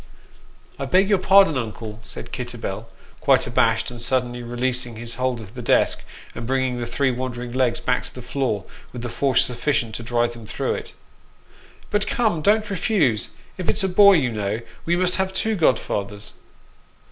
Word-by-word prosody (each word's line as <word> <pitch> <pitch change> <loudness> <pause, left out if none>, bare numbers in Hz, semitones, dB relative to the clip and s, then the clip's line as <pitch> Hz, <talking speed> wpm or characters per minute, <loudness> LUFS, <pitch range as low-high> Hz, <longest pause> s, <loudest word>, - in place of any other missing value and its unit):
" - - -26 0.3
I 135 - -2
beg 185 +7 +3
your 200 -3 +4
pardon, 190 -7 +5
uncle," 110 -1 -6
said - - -9
Kitterbell, - - -5 0.3
quite - - +3
abashed, 125 - +1
suddenly 120 0 0
releasing 120 0 -2
his 115 +1 -3
hold 125 -1 -1
of 105 -2 -11
the 125 - -7
desk, 120 - +2 0.3
and 115 -1 -6
bringing 130 -1 0
the 120 - -3
three 130 +3 +1
wandering 125 -1 -4
legs 130 -2 +1
back 125 -1 0
to - - -10
the 125 - -8
floor, 125 -6 -2 0.3
with 120 -1 -6
a - - -3
force 135 +1 +2
sufficient 125 -2 -1
to 120 - -4
drive 120 0 0
them 115 -2 -11
through - - -1
it. - - -6 0.5
"' - - -26
But 205 0 +1
come, 215 -9 +1
don't 210 +4 +2
refuse. 180 - +1 0.3
If 185 - -2
it's* 205 - +1
a - - +3
boy, 200 +2 +7
you 135 -9 +2
know, 105 +1 -2 0.3
we 170 - +3
must 180 0 +1
have 190 0 0
two 220 +3 0
godfathers." 105 - 0
125 Hz, 180 wpm, -23 LUFS, 120-175 Hz, 0.5 s, boy